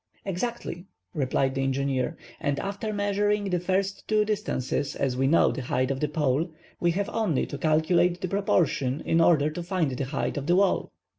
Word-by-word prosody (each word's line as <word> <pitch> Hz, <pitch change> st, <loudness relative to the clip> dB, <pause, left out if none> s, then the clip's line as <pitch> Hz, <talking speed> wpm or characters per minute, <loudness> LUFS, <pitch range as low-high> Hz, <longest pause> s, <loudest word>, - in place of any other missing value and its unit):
"Exactly," 195 Hz, -2 st, -4 dB, 0.3 s
replied 135 Hz, -3 st, 0 dB
the 135 Hz, -, -1 dB
engineer, 135 Hz, -1 st, 0 dB, 0.2 s
"and 145 Hz, -1 st, -1 dB
after 200 Hz, +2 st, -3 dB
measuring 205 Hz, 0 st, +1 dB
the 180 Hz, -, +1 dB
first 190 Hz, +2 st, -1 dB
two 215 Hz, -1 st, +3 dB
distances, 145 Hz, -, -2 dB
as 130 Hz, -2 st, 0 dB
we 135 Hz, +1 st, +1 dB
know 165 Hz, +4 st, +4 dB
the 135 Hz, -, -4 dB
height 130 Hz, +1 st, 0 dB
of 135 Hz, -, -2 dB
the 150 Hz, -, +1 dB
pole, 150 Hz, +2 st, 0 dB, 0.3 s
we 175 Hz, -, +2 dB
have 195 Hz, +4 st, 0 dB
only 210 Hz, -, 0 dB
to 145 Hz, -, -7 dB
calculate 165 Hz, +3 st, +2 dB
the 185 Hz, -, -2 dB
proportion 160 Hz, -8 st, +1 dB
in 165 Hz, 0 st, +2 dB
order 155 Hz, -3 st, +4 dB
to 175 Hz, -, -5 dB
find 175 Hz, -4 st, 0 dB
the 130 Hz, +1 st, -2 dB
height 135 Hz, +2 st, -2 dB
of 145 Hz, 0 st, -3 dB
the 175 Hz, -, +4 dB
wall." 195 Hz, +1 st, +2 dB
165 Hz, 190 wpm, -26 LUFS, 135-195 Hz, 0.3 s, know